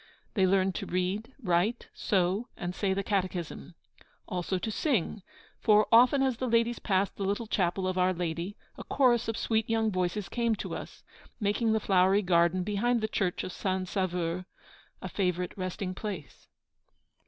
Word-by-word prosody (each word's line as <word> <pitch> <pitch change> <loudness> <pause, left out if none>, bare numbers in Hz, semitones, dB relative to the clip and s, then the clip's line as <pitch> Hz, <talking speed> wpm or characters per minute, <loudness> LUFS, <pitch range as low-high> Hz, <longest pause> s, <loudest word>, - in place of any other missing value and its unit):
They 190 -3 +3
learned 190 0 +2
to - - -5
read, 195 +7 -2
write, 180 +6 +1
sew, 195 +4 0
and 175 0 -4
say 195 +1 0
the 195 +1 0
catechism. 180 -5 -3 0.5
Also 180 +1 -2
to 220 +4 -3
sing; 215 - 0 0.4
for, 210 -1 +5
often 250 +4 +6
as 260 -3 +1
the 255 - -2
ladies 230 +1 +2
passed 195 -1 0
the 200 - -3
little 200 +4 -1
chapel 185 -2 0
of 185 0 -1
Our 180 +1 +4
Lady, 175 +2 -3 0.2
a - - -6
chorus 245 -4 +2
of 225 0 -2
sweet 225 -1 0
young 225 -1 +2
voices 185 +1 -1
came 235 -2 0
to - - -5
us, - - -8 0.4
making 220 +1 +1
the 220 - +2
flowery 195 0 +3
garden 175 0 +3
behind 220 +4 +1
the 220 - 0
church 190 -4 -1
of - - -5
St. 185 0 -2
Sauveur 180 -2 -1 0.6
a - - -3
favourite 180 -2 -1
resting 185 0 -3
place. 190 -6 -7
195 Hz, 165 wpm, -29 LUFS, 180-220 Hz, 0.6 s, often